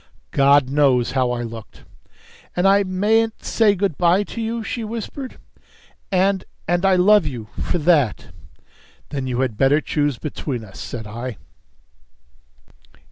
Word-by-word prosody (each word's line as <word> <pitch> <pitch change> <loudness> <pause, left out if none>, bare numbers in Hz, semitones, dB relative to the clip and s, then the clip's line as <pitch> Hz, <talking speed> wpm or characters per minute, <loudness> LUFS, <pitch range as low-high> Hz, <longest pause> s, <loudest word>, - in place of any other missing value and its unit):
God 140 0 +4
knows 135 -4 +3
how 130 -2 +1
I 120 0 -2
looked! 115 -2 -9 0.7
"And 180 +2 +2
I 200 +1 +5
mayn't 215 +4 +1
say 215 -3 +3
good 190 -5 -1
by 180 +3 +4
to 230 - -7
you," 225 0 -3
she 230 +1 -4
whispered. 230 +4 -6 0.7
"And 190 0 +2 0.2
and 175 +2 +2
I 190 - +4
love 190 -1 +5
you 115 -6 -7
for - - -1
that!" 145 - +1 0.8
"Then 135 -2 -4
you 125 0 -1
had 120 -5 -2
better 135 +3 +4
choose 145 -4 -1
between 135 -4 -5
us," 95 - -13
said 115 -3 -6
I. 115 +2 -6
155 Hz, 140 wpm, -21 LUFS, 125-200 Hz, 0.8 s, I